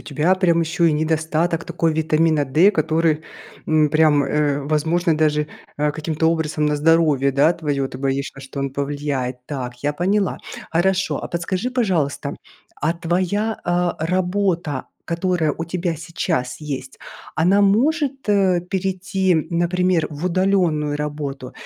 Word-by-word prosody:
тебя 155 +5 +1
прям 175 -3 +2
ещё 165 +1 0
и 165 - +5
недостаток 160 +2 0
такой 165 -1 0
витамина 155 -1 +2
D, 160 +10 +5
который, 160 -3 +1 0.5
м, 155 -1 +4
прям, 155 -2 +4
э, 145 0 0
возможно 160 +4 +1
даже, 150 -1 +2 0.3
а, 150 0 +1
каким-то 155 +1 -2
образом 160 -2 -1
на 150 0 +1
здоровье, 150 -3 +3
да, 145 +5 +4
твоё. 145 -5 -2
Ты 130 - -9
боишься, 135 0 -2
что 135 +1 -7
он 140 0 -2
повлияет. 140 -3 -3
Так, 125 -4 -6
я 145 +1 +1
поняла. 190 +5 0 0.3
Хорошо, 190 +3 +1
а - - -5
подскажи 185 +7 -2
пожалуйста, 185 - -1 0.5
а 160 +3 +1
твоя, 185 +6 -1
э, 175 0 +1 0.2
работа, 180 -5 0 0.2
которая 170 -2 0
у 165 - -2
тебя 170 0 -2
сейчас 165 -5 -3
есть, 135 -3 -6 0.4
она 185 +5 +3
может, 270 +6 +1
э, 190 -3 +3
перейти, 190 -1 0 0.2
например, 175 0 +1
в 155 +3 -4
удаленную 175 -5 +1
работу 145 -3 -5
160 Hz, 140 wpm, -21 LUFS, 150-180 Hz, 0.5 s, и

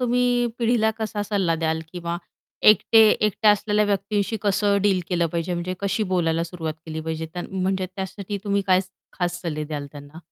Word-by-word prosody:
तुम्ही 245 0 +2
पिढीला 230 -2 +2
कसा 215 -1 -2
सल्ला 195 -5 0
द्याल 160 0 -1
किंवा 170 -1 -3 0.5
एकटे 220 +2 +4
एकट्या 210 0 +3
असलेल्या 210 0 +2
व्यक्तींशी 205 +1 0
कसं 205 0 +2
डील 195 -3 +3
केलं 175 -2 +1
पाहिजे 170 +2 -2
म्हणजे 175 +1 -3
कशी 200 +2 0
बोलायला 165 -2 +1
सुरुवात 165 -3 -5
केली 160 0 -4
पाहिजे? 160 0 -4 0.2
म्हणजे 190 0 -1
त्यासाठी 195 +1 -5
तुम्ही 200 -1 +1
काय 185 -1 +5 0.4
खास 175 -1 -1
सल्ले 155 -3 -3
द्याल 145 -1 -5
त्यांना? 145 +1 -11
190 Hz, 165 wpm, -23 LUFS, 165-210 Hz, 0.5 s, काय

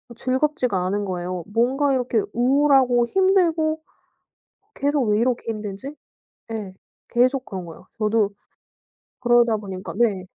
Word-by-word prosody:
즐겁지가 255 -7 0
않은 205 +2 -1
거예요. 180 -1 -4
뭔가 270 +4 +2
이렇게 250 -3 +1
우울하고 260 -1 +4
힘들고 335 -3 +2 0.9
'계속 285 0 0
왜 210 +1 +2
이렇게 245 -1 0
힘들지?' 215 +6 -6 0.6
예 205 -4 -5 0.4
계속 255 +2 +2
그런 185 -3 -6
거예요. 165 +2 -12
저도 215 -1 +2 0.9
그러다 240 -2 +4
보니까 190 -2 -7
네. 205 -6 +1
240 Hz, 270 characters per minute, -23 LUFS, 205-275 Hz, 0.9 s, 우울하고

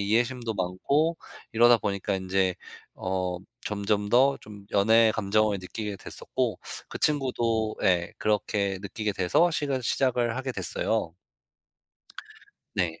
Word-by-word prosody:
이해심도 115 +2 0
많고 140 - 0 0.3
이러다 120 +1 +6
보니까 100 -1 -2
인제 95 -1 0 0.4
어 90 -1 -2 0.3
점점 105 0 -1
더 135 +4 +4
좀 105 -1 -12
연애 110 +2 +5
감정을 105 0 +1
느끼게 105 +2 -5
됐었고 - - -3 0.3
그 - - -6
친구도 120 -7 +1
예 90 -2 +2
그렇게 100 -2 0
느끼게 105 +1 -3
돼서 95 - +3
시가 140 -4 -1
시작을 120 -2 +1
하게 130 0 -3
됐어요. 95 -7 -1 1.6
네. 85 -3 -1
105 Hz, 250 characters per minute, -27 LUFS, 95-120 Hz, 1.6 s, 이러다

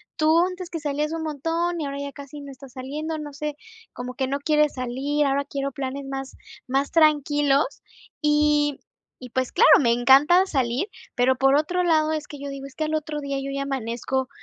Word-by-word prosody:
tú 315 0 +4
antes 365 0 -1
que 330 - -3
salías 295 0 -2
un 325 - -3
montón 330 +3 -1
y 300 - -2
ahora 280 0 -4
ya 280 0 -5
casi 285 +1 -10
no 280 - -9
estás 265 -1 -13
saliendo, 305 +5 -4
no 295 -1 -7
sé, 300 0 -4 0.4
como 250 0 -6
que 265 +1 -1
no 280 +1 -2
quieres 300 0 +2
salir". 270 +4 -1
Ahora 280 +1 0
quiero 275 -1 -3
planes 275 0 -5
más 270 0 -6 0.3
más 275 +2 0
tranquilos 295 -2 +3 0.5
y 295 -1 +2 0.4
y, 250 - -8
pues, 260 +2 -1
claro, - - +5
me 235 -4 +3
encanta 275 +10 +5
salir, 265 - 0 0.3
pero 255 +1 +3
por 270 +1 +4
otro 355 +5 +1
lado, 315 -2 +3
es 305 -1 -3
que 290 - -9
yo 280 0 -6
digo: 275 0 -7
"Es 270 - -15
que 310 - -1
al 310 0 -1
otro 305 -1 -3
día 280 -1 -3
yo 275 0 -4
ya 275 - -2
amanezco 265 0 -2
285 Hz, 205 wpm, -24 LUFS, 270-305 Hz, 0.5 s, claro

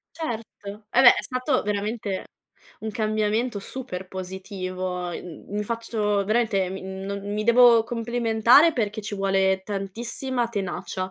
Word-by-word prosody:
Certo, 220 -7 -6
eh, 245 - +4
beh, 245 - +9
è - - -3
stato 255 +1 0
veramente 205 -1 -2 0.6
un 220 - -4
cambiamento 215 +2 0
super 195 -4 -7
positivo, 185 -1 -5
mhmm, 170 -1 -8
mi 210 - -1
faccio 215 -3 -1
veramente, 215 -3 +1
mi 190 +1 -6
non 195 +1 -5
mi 210 0 -1
devo 235 -1 +7
complimentare, 235 +5 +4
perché 215 -2 -1
ci 210 0 -5
vuole 195 -1 +1
tantissima 230 +5 -3
tenacia 190 -2 -4
210 Hz, 130 wpm, -25 LUFS, 190-235 Hz, 0.6 s, beh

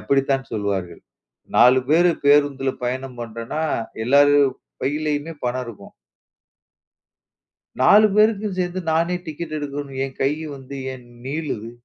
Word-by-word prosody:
அப்படித்தான் 135 -1 0
சொல்லுவார்கள். 100 -5 -3 0.5
4 130 +1 +6
பேரு 170 +3 +4
பேருந்துல 145 -2 +3
பயணம் 130 0 -4
பண்றோம்னா, 115 +6 -5 0.4
எல்லாரு 145 +3 +5 0.5
பையிலயுமே 150 +3 -2
பணம் 125 +1 -1
இருக்கும் 100 -4 -11 1.9
4 210 +11 +7
பேருக்கும் 210 -2 +2
சேந்து 180 +1 -1
நானே 170 +3 +1
டிக்கெட் 155 0 -6
எடுக்கணுன்னு 140 -2 -5
என் 135 - -12
கையி 150 +3 -1
வந்து 135 +1 -9 0.2
ஏன் 125 -1 -13 0.2
நீளுது? 140 -7 -4
140 Hz, 110 wpm, -22 LUFS, 130-160 Hz, 1.9 s, 4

